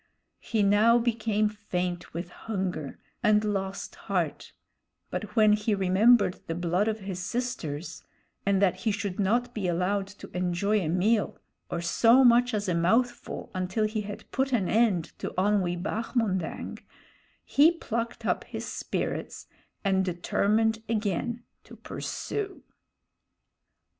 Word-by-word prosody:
He 220 Hz, -3 st, 0 dB
now 210 Hz, +4 st, +5 dB
became 225 Hz, -3 st, +1 dB
faint 180 Hz, -4 st, -3 dB
with 170 Hz, +2 st, -5 dB
hunger, 185 Hz, -10 st, -4 dB, 0.2 s
and 210 Hz, 0 st, +4 dB
lost 195 Hz, -2 st, -3 dB, 0.2 s
heart; -, -, -1 dB, 0.6 s
but 210 Hz, -1 st, -5 dB
when 215 Hz, -1 st, +6 dB
he 210 Hz, 0 st, +1 dB
remembered 195 Hz, +2 st, +4 dB
the 165 Hz, -, -2 dB
blood 175 Hz, +4 st, +1 dB
of 220 Hz, -1 st, -1 dB
his 190 Hz, -2 st, -5 dB
sisters, 180 Hz, -, -4 dB, 0.4 s
and 200 Hz, -1 st, +2 dB
that 185 Hz, -, +3 dB
he 225 Hz, -, 0 dB
should 200 Hz, -2 st, -3 dB
not 230 Hz, +5 st, +1 dB
be 200 Hz, -4 st, -2 dB
allowed 185 Hz, +3 st, 0 dB
to 200 Hz, 0 st, -12 dB
enjoy 180 Hz, +4 st, +1 dB
a 175 Hz, -, -2 dB
meal, 205 Hz, +6 st, +1 dB, 0.3 s
or 170 Hz, -, -2 dB
so 230 Hz, +9 st, +5 dB
much 245 Hz, 0 st, +5 dB
as 205 Hz, -1 st, -2 dB
a 180 Hz, -, +1 dB
mouthful, 225 Hz, +9 st, 0 dB
until 185 Hz, +3 st, 0 dB
he 215 Hz, 0 st, -1 dB
had 205 Hz, 0 st, -8 dB
put 265 Hz, 0 st, 0 dB
an 200 Hz, -7 st, +2 dB
end 210 Hz, -7 st, +2 dB
to -, -, -5 dB
Onwee 185 Hz, -2 st, +2 dB
Bahmondang, 210 Hz, -5 st, -2 dB, 0.6 s
he 300 Hz, +4 st, +5 dB
plucked 235 Hz, -7 st, -4 dB
up -, -, 0 dB
his -, -, -6 dB
spirits -, -, -4 dB, 0.4 s
and 190 Hz, -1 st, +3 dB
determined 215 Hz, +5 st, +1 dB
again 230 Hz, +2 st, -1 dB, 0.2 s
to -, -, -12 dB
pursue. 400 Hz, -2 st, -5 dB
205 Hz, 135 wpm, -28 LUFS, 185-225 Hz, 0.6 s, when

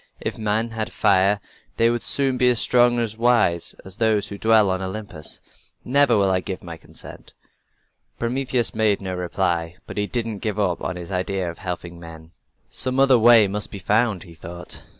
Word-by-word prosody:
"If -, -, -3 dB
men 110 Hz, +2 st, -1 dB
had 110 Hz, -1 st, -4 dB
fire 100 Hz, +1 st, +3 dB, 0.4 s
they 115 Hz, +1 st, +4 dB
would 120 Hz, -1 st, -2 dB
soon 135 Hz, -2 st, +2 dB
be 125 Hz, -, +5 dB
as 120 Hz, -2 st, +3 dB
strong 120 Hz, -1 st, +3 dB
and 115 Hz, -3 st, -1 dB
wise 115 Hz, -8 st, +2 dB
as 95 Hz, 0 st, -10 dB
we 115 Hz, -, +3 dB, 0.2 s
who 100 Hz, -, -8 dB
dwell 110 Hz, -3 st, +4 dB
on 95 Hz, 0 st, -2 dB
Olympus. 95 Hz, -5 st, -6 dB, 0.4 s
Never 135 Hz, -2 st, +4 dB
will 100 Hz, -1 st, +2 dB
I 95 Hz, -, +2 dB
give 95 Hz, 0 st, -6 dB
my 85 Hz, -2 st, -7 dB
consent." 80 Hz, -, -12 dB, 0.8 s
Prometheus 125 Hz, 0 st, -1 dB
made 105 Hz, -2 st, +2 dB
no 95 Hz, -1 st, -5 dB
reply, 90 Hz, -2 st, -2 dB
but -, -, -10 dB
he 105 Hz, 0 st, 0 dB
didn't 115 Hz, -3 st, -2 dB
give 105 Hz, -1 st, -3 dB
up 90 Hz, -4 st, 0 dB, 0.2 s
his 85 Hz, +1 st, -8 dB
idea 90 Hz, -1 st, -2 dB
of 85 Hz, -, -15 dB
helping 90 Hz, -2 st, -6 dB
men. 80 Hz, -1 st, -12 dB, 0.4 s
"Some 130 Hz, +1 st, +2 dB
other 135 Hz, -3 st, +5 dB
way 115 Hz, -2 st, +7 dB
must 105 Hz, +2 st, -1 dB
be -, -, -8 dB
found," 105 Hz, +1 st, 0 dB
he 85 Hz, -4 st, -14 dB
thought. 85 Hz, +2 st, -8 dB
105 Hz, 185 wpm, -22 LUFS, 90-115 Hz, 0.8 s, way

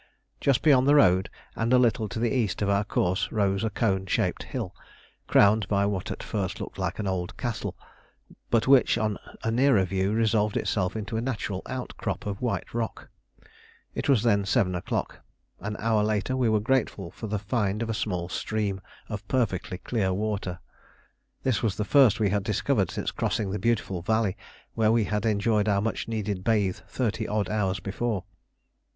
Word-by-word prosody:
Just 140 Hz, -2 st, +2 dB
beyond 135 Hz, -4 st, +5 dB
the 145 Hz, -, +6 dB
road 95 Hz, -10 st, +5 dB, 0.3 s
and 115 Hz, +1 st, 0 dB
a 130 Hz, -, +7 dB
little 115 Hz, -3 st, +2 dB
to 90 Hz, -, -6 dB
the 115 Hz, +3 st, +1 dB
east 110 Hz, -5 st, 0 dB
of 100 Hz, -, +1 dB
our 100 Hz, +1 st, +2 dB
course 95 Hz, 0 st, 0 dB
rose 100 Hz, -1 st, +1 dB
a 110 Hz, -, +1 dB
cone 95 Hz, -3 st, 0 dB
shaped -, -, 0 dB
hill, -, -, -5 dB, 0.5 s
crowned 105 Hz, -1 st, +5 dB
by 100 Hz, 0 st, +2 dB
what 100 Hz, -2 st, -2 dB
at -, -, -5 dB
first -, -, -3 dB
looked -, -, -7 dB
like -, -, -2 dB
an 105 Hz, -, -3 dB
old 95 Hz, -2 st, -3 dB
castle, 120 Hz, -3 st, -3 dB, 0.7 s
but 115 Hz, -2 st, +2 dB
which, 135 Hz, -2 st, +5 dB
on 105 Hz, -2 st, -1 dB, 0.2 s
a 115 Hz, -, 0 dB
nearer 125 Hz, -4 st, +4 dB
view, 95 Hz, +2 st, 0 dB
resolved 110 Hz, -1 st, +2 dB
itself 95 Hz, -1 st, 0 dB
into 110 Hz, +1 st, -3 dB
a -, -, 0 dB
natural 105 Hz, -6 st, -3 dB
outcrop 130 Hz, -1 st, -4 dB
of 100 Hz, -1 st, -4 dB
white 115 Hz, -7 st, -2 dB
rock. 115 Hz, -1 st, -4 dB, 0.8 s
It -, -, -3 dB
was 125 Hz, -6 st, +4 dB
then 100 Hz, -4 st, +3 dB
7 95 Hz, -1 st, +2 dB
o'clock. 90 Hz, -, -3 dB, 0.4 s
An 105 Hz, +1 st, -4 dB
hour 110 Hz, -1 st, +2 dB
later 105 Hz, +3 st, 0 dB
we 125 Hz, -3 st, +2 dB
were 110 Hz, -1 st, +3 dB
grateful 105 Hz, -6 st, 0 dB
for 110 Hz, -, -7 dB
the 105 Hz, 0 st, -1 dB
find 105 Hz, +1 st, -1 dB
of 115 Hz, -, -5 dB
a -, -, -1 dB
small 95 Hz, -5 st, -2 dB
stream 100 Hz, 0 st, -2 dB, 0.3 s
of 105 Hz, -2 st, -6 dB
perfectly 95 Hz, -8 st, -1 dB
clear 95 Hz, -1 st, -1 dB
water. 100 Hz, -2 st, -2 dB, 0.9 s
This 130 Hz, -5 st, +1 dB
was 110 Hz, -4 st, 0 dB
the 105 Hz, -, -2 dB
first 120 Hz, -1 st, +5 dB
we 105 Hz, -3 st, +2 dB
had 100 Hz, -1 st, 0 dB
discovered 105 Hz, -1 st, +1 dB
since -, -, -3 dB
crossing 100 Hz, -3 st, -1 dB
the 105 Hz, -, -2 dB
beautiful 100 Hz, -4 st, 0 dB
valley 110 Hz, +1 st, +1 dB, 0.4 s
where 110 Hz, -1 st, +3 dB
we 115 Hz, -1 st, +3 dB
had 105 Hz, +1 st, -1 dB
enjoyed 105 Hz, 0 st, +2 dB
our 100 Hz, -1 st, +3 dB
much 110 Hz, +3 st, -2 dB
needed 105 Hz, -4 st, -3 dB
bathe 105 Hz, -4 st, +1 dB
thirty 110 Hz, -3 st, -2 dB
odd 105 Hz, -1 st, -1 dB
hours 100 Hz, -3 st, 0 dB
before. 100 Hz, +1 st, -2 dB
105 Hz, 185 wpm, -27 LUFS, 100-115 Hz, 0.9 s, a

